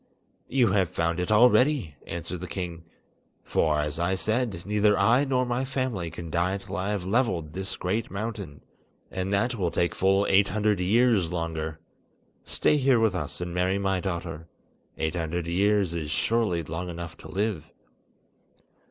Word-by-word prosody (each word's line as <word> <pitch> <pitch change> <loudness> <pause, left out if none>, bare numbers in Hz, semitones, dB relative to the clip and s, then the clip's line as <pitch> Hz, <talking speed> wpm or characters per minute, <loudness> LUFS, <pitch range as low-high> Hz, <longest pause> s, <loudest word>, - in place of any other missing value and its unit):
"You 125 -4 +3
have 95 -3 +2
found 85 +1 -1
it 90 +3 -1
already," 125 - +4
answered 85 +2 -5
the 90 - -5
king, 85 -2 -5 0.6
"for, 75 -2 +1
as 75 +1 -3
I 85 +2 +1
said, 110 -2 -1
neither 105 0 +3
I 125 +5 +4
nor 130 -2 +1
my 120 +1 -1
family 130 -10 -2
can 85 -1 -8
die 90 +4 +1
till 100 0 -8
I 95 +1 -2
have 100 -4 -2
levelled 95 - 0
this 95 0 -4
great 105 +5 -2
mountain; 100 -7 -5 0.5
and 95 +1 -3
that 110 +5 +1
will 95 -7 -1
take 85 +1 0
full 95 +1 +2
eight 100 +1 +4
hundred 105 0 +1
years 100 -2 +3
longer. 80 -2 -3 0.7
Stay 150 - +1
here 130 -3 +4
with 110 -3 +3
us 85 -2 -4
and 90 -1 -4
marry 90 +2 +1
my 95 -1 0
daughter. 85 -3 -4 0.5
Eight 80 0 -1
hundred 85 0 -2
years 100 +1 +2
is 80 -3 -3
surely 90 +1 +1
long 80 +4 -5
enough 85 -1 -6
to - - -11
live." 95 -5 -2
95 Hz, 165 wpm, -27 LUFS, 85-110 Hz, 0.7 s, already